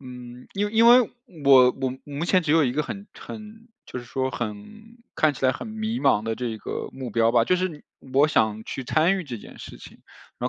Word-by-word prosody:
嗯， 125 -1 -11
因 205 +2 -1
因 230 +1 +5
为 245 +1 +8 0.4
我 130 -2 +7
我 130 -1 -1
目 145 +3 -4
前 185 0 +3
只 160 - -2
有 160 0 +5
一 125 - 0
个 150 +3 0
很 200 +6 -7
很 220 +1 -11 0.2
就 125 - -7
是 120 - -9
说 130 +2 -2
很 105 -4 -5 0.5
看 155 -2 +2
起 135 - -6
来 130 - +4
很 - - -7
迷 220 +2 -3
茫 105 - +3
的 115 0 -2
这 125 - -4
一 110 -1 -3
个 - - -5
目 130 -3 -7
标 115 +1 +3
吧， 115 -1 +4
就 185 - +2
是 185 +1 0
你 150 -3 -11 0.3
我 140 +2 +6
想 110 -5 +1
去 135 - -5
参 160 +9 +2
与 180 - -5
这 120 -5 -6
件 - - -13
事 - - -10
情， - - -14 0.4
然 - - -1
135 Hz, 250 characters per minute, -24 LUFS, 120-185 Hz, 0.5 s, 为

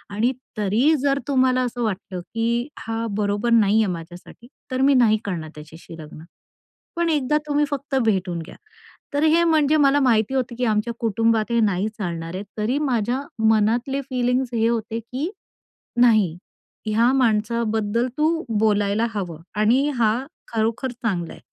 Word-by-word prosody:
आणि 235 +5 +2 0.3
तरी 225 +10 +2
जर 280 -1 +1
तुम्हाला 255 -2 +2
असं 245 0 -3
वाटलं 195 -3 -4
की 230 +5 -2
हा 225 0 -3
बरोबर 205 +3 0
नाही 220 -1 +4
आहे, 195 - -1
माझ्यासाठी. 175 +7 -11 0.2
तर 255 +1 -1
मी 280 +1 +5
नाही 220 -3 +4
करणार 165 -6 -4
त्याच्याशी 160 +2 -12
लग्न, 155 +1 -11 0.7
पण 340 -1 +1
एकदा 300 -1 +1
तुम्ही 295 0 +2
फक्त 280 -1 -4
भेटून 190 -5 0
घ्या". 165 - -11 0.6
तर 290 +2 +1
हे 325 +2 +4
म्हणजे 310 -2 +3
मला 285 0 +4
माहिती 230 -1 +2
होतं 245 -2 -1
की 250 - +1
आमच्या 220 +2 0
कुटुंबात 225 0 +1
हे 235 - +2
नाही 200 -1 +1
चालणार 170 -2 -4
आहे, 195 - -4 0.2
तरी 240 +6 0
माझ्या 250 -2 0 0.3
मनातले 235 +6 +2
फीलिंग्स 250 -1 -1
हे 230 -1 +2
होते 230 -1 -2
की 255 - -4 0.7
"नाही, 215 -9 +4 0.5
की 215 - -2
ह्या 235 +3 +4
माणसाबद्दल 225 -1 +1
तू 320 +2 +1 0.2
बोलायला 210 +1 +2
हवं 175 -6 -5 0.2
आणि 250 +7 +3
हा 220 -1 +3 0.4
खरोखर 230 +3 -1
चांगला 200 -9 -3
आहे." - - -14
230 Hz, 155 wpm, -22 LUFS, 205-260 Hz, 0.7 s, मी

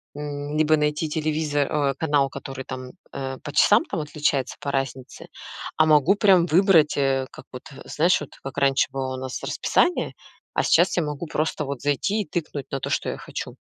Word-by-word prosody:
м, 145 0 -5
либо 155 0 +4
найти 150 +1 0
телевизор, 150 -2 -1
э, 145 -2 +1
канал, 145 -3 +1
который 135 -1 -7
там, 130 -1 -7 0.2
э, 130 -1 -4
по 145 - -7
часам - - +5
там - - -3
отличается, 150 -3 -1
по 140 - -3
разнице, 135 -2 -4 0.5
а 155 - +5
могу 155 +4 +5
прям 195 -4 +5
выбрать, 175 -2 +4
э, 135 -1 +1
как - - -12
вот, 125 - -8
э, 135 - -12
знаешь, 170 +4 +2
вот 150 - -8
как 135 0 -7
раньше 140 -1 +3
было 130 -1 -3
у - - -6
нас 130 -1 -5
расписание, 355 - +1 0.4
а - - +1
сейчас - - +3
я 170 - +2
могу 150 +2 -5
просто 155 0 -1
вот 140 -2 -5
зайти 145 +9 0
и - - -4
тыкнуть 150 -5 -4
на 135 - -2
то, - - -3
что - - -1
я - - -4
хочу. - - -7
145 Hz, 195 wpm, -24 LUFS, 135-155 Hz, 0.5 s, часам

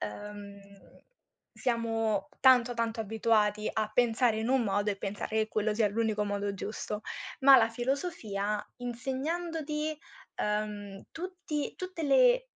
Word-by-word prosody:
Ehm, 200 - -7 0.9
siamo 225 -2 -1
tanto, 250 -2 +6
tanto 230 -1 -1
abituati 215 -1 +1
a 215 -1 -1
pensare 235 -1 +3
in 220 +1 -1
un 265 -1 +3
modo 205 -1 +1
e 200 - -2
pensare 205 +2 -4
che 215 0 +1
quello 215 0 0
sia 210 0 +2
l'unico 215 0 0
modo 205 0 -2
giusto, 210 +1 -5 0.4
ma 270 0 +9
la 225 -2 +4
filosofia, 230 - -2
insegnandoti, 300 +5 -3 0.4
ehm, 210 -1 -3
tutti 355 -4 -4
tutte 370 -2 -6
le - - +5
225 Hz, 125 wpm, -30 LUFS, 210-270 Hz, 0.9 s, ma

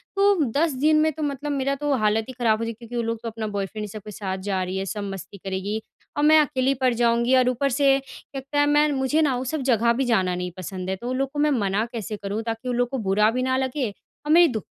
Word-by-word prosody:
तो 400 0 +4 0.2
10 325 0 +3
दिन 310 +1 +5
में 315 0 +3
तो 310 +1 -5
मतलब 290 +1 -3
मेरा 275 0 0
तो 290 0 -1
हालत 215 +1 +2
ही - - -6
ख़राब 230 -3 +1
हो - - -2
जाएगी, 230 - -3
क्योंकि 235 +2 -10
वो 235 - +1
लोग 230 0 -2
तो 230 - -3
अपना 220 -1 -5
बॉयफ्रेंड 205 +1 -4
इन - - -4
सब 215 0 -8
के 210 - -7
साथ 190 -1 -4
जा 190 -1 0
रही 185 +1 -3
हैं, 195 - -2
सब 205 +1 -4
मस्ती 195 +1 -9
करेगी 195 +3 -3 0.4
और 290 - +1
मैं 310 +1 +7
अकेली 275 -2 +2
पड़ 250 -2 +4
जाऊँगी 235 +2 +2
और 250 -1 +4
ऊपर 265 +3 0
से 275 +1 +4
कहता 275 +1 -5
है, 290 - +5
मैं 295 +1 +4
न - - 0
मुझे 265 +4 +1
ना 275 -4 +2
वो 255 - -3
सब 305 - -1
जगह 235 +1 +3
भी 265 +2 0
जाना 185 -7 +1
नहीं 180 0 -4
पसंद 185 0 -5
है। 190 - 0
तो 240 +5 -6
उन 255 - -1
लोग 270 0 -1
को 290 - -3
मैं 300 0 +3
मना 200 +2 0
कैसे 215 -2 -4
करूँ 205 +2 -3
ताकि 225 +2 -4
उन 245 - 0
लोग 245 0 +1
को 270 - -3
बुरा 210 +3 +4
भी 255 +1 -1
ना 260 0 +1
लगे 260 -2 -1 0.4
और 300 - 0
मेरी 345 +1 +7
दो 220 - -2
240 Hz, 285 wpm, -24 LUFS, 210-275 Hz, 0.4 s, मैं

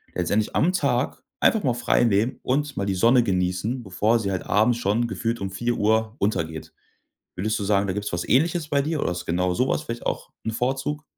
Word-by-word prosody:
letztendlich 100 +4 0
am 175 - +3
Tag 140 -7 0 0.2
einfach 220 - +3
mal 125 - +2
freinehmen 115 -1 +2
und 145 +2 -1
mal 100 - -1
die 95 - 0
Sonne 120 +6 +5
genießen, 95 +5 -1
bevor 105 +4 +1
sie 100 -3 -2
halt 95 - -2
abends 115 +3 +3
schon 110 +2 +1
gefühlt 115 0 -2
um 95 -1 -3
16:00 120 +5 -1
Uhr 110 +1 +1
untergeht. 80 -6 -2 0.6
Würdest 110 +4 -1
du - - -3
sagen, 100 -1 +2
da - - 0
gibt's 105 -1 -4
was 85 0 -2
Ähnliches 160 +3 +2
bei 140 -2 +2
dir, 155 +1 -2
oder - - 0
ist 90 - -5
genau 90 +2 0
so 125 +2 +1
was - - 0
vielleicht 115 0 -6
auch - - -3
'n 110 - -1
Vorzug? 135 +5 -2
110 Hz, 210 wpm, -24 LUFS, 100-125 Hz, 0.6 s, Sonne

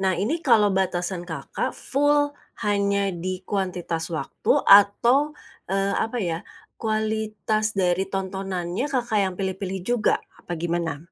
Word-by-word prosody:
Nah 190 -1 +1
ini 245 - -1
kalo 210 -8 +4
batasan 180 -1 -1
Kakak 160 - -4
full 290 +1 +2 0.3
hanya 200 -1 +1
di 185 +2 -4
kuantitas 180 -4 -2
waktu 165 -3 -1
atau, 240 +9 +5 0.3
eee, 195 +1 +1
apa 225 +2 -5
ya, 170 -8 -1 0.4
kualitas 215 -1 -1
dari 185 0 +1
tontonannya 190 +3 -3
Kakak 240 -5 0
yang 190 -2 0
pilih-pilih 190 0 -3
juga, 240 -2 +2 0.2
apa 175 - -5
gimana? 170 -2 -2
195 Hz, 125 wpm, -24 LUFS, 180-220 Hz, 0.4 s, atau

